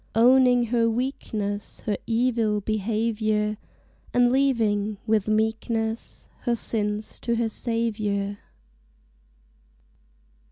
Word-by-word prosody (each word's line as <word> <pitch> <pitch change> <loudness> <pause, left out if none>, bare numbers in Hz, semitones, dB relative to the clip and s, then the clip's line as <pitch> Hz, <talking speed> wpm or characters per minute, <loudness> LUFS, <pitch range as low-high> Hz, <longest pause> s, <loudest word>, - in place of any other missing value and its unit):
Owning 250 +1 +5
her 230 -1 +3
weakness, 220 -4 -3
Her 210 - -1
evil 230 -2 +1
behavior, 215 0 0 0.6
And 245 0 +5
leaving, 220 -6 +1
with 215 -2 +1
meekness, 220 +1 -1
Her 240 -2 0
sins 210 -2 -2
to 235 - -1
her 230 -1 0
Saviour! 210 -4 -2
220 Hz, 85 wpm, -25 LUFS, 210-235 Hz, 0.6 s, Owning